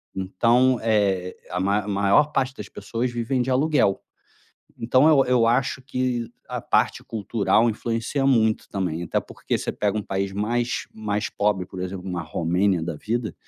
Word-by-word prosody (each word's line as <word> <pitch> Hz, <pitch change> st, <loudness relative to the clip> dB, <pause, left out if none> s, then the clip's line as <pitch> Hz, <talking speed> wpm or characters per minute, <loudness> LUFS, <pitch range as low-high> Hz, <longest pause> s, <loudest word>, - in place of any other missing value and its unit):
então, 115 Hz, +7 st, +2 dB
eh, 100 Hz, -5 st, +1 dB
a 90 Hz, -, -2 dB
ma 100 Hz, +2 st, 0 dB
maior 100 Hz, +9 st, +3 dB
parte 130 Hz, -1 st, 0 dB
das -, -, -8 dB
pessoas 120 Hz, +2 st, -3 dB
vivem 120 Hz, +2 st, -1 dB
de 125 Hz, -, -2 dB
aluguel. 130 Hz, -6 st, +2 dB, 0.8 s
Então 130 Hz, +5 st, +4 dB
eu 145 Hz, -4 st, +5 dB
eu 125 Hz, -2 st, +3 dB
acho 130 Hz, +2 st, +1 dB
que 125 Hz, -3 st, -2 dB, 0.2 s
a -, -, -3 dB
parte -, -, +1 dB
cultural 110 Hz, 0 st, +1 dB
influencia 115 Hz, +5 st, -2 dB
muito 110 Hz, -5 st, +2 dB
também, 90 Hz, -4 st, -2 dB
até -, -, -1 dB
porque -, -, -4 dB
você -, -, -3 dB
pega 105 Hz, 0 st, -1 dB
um -, -, -2 dB
país 95 Hz, 0 st, -2 dB
mais 120 Hz, +4 st, -1 dB
mais 105 Hz, -1 st, -2 dB
pobre, 100 Hz, -3 st, 0 dB
por 95 Hz, -, -8 dB
exemplo, 90 Hz, 0 st, -5 dB
uma 90 Hz, -2 st, -3 dB
Romênia 90 Hz, +3 st, 0 dB
da 80 Hz, -1 st, -4 dB
vida, 115 Hz, +6 st, -3 dB
110 Hz, 165 wpm, -24 LUFS, 95-125 Hz, 0.8 s, eu